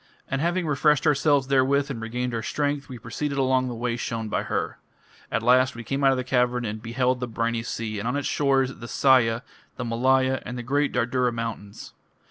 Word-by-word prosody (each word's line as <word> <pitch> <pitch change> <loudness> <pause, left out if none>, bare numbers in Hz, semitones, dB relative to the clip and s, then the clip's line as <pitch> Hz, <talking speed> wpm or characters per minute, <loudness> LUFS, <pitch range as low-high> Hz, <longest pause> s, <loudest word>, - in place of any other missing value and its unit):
And 135 +1 -2
having 175 +2 0
refreshed 150 0 +2
ourselves 145 -2 +3
therewith 140 +1 +2
and 115 -4 -5
regained 125 +2 -3
our 115 - -1
strength, 145 +3 -2
we 125 - -7
proceeded 140 +6 -4
along 130 -1 +2
the 120 - -4
way 120 0 -2
shown 115 -2 -3
by - - 0
her. - - -3 0.5
At 115 - -1
last 130 +1 +4
we 115 - -7
came 135 +3 -2
out 135 - +6
of 135 - +2
the 130 - -1
cavern 125 -1 +1
and 110 0 -4
beheld 125 +2 0
the 125 - -3
briny 115 0 -1
sea, 115 -2 -4
and 110 - -3
on 125 - -1
its 145 - -2
shores, 135 -2 +1
the 120 - -8
Sahya, 120 -3 +3 0.3
the 125 - -4
Malaya, 130 +3 +2
and 125 - -6
the 120 - -5
great 145 +4 +1
Dardura 125 0 +1
mountains. 115 -3 -6
125 Hz, 210 wpm, -25 LUFS, 115-135 Hz, 0.5 s, out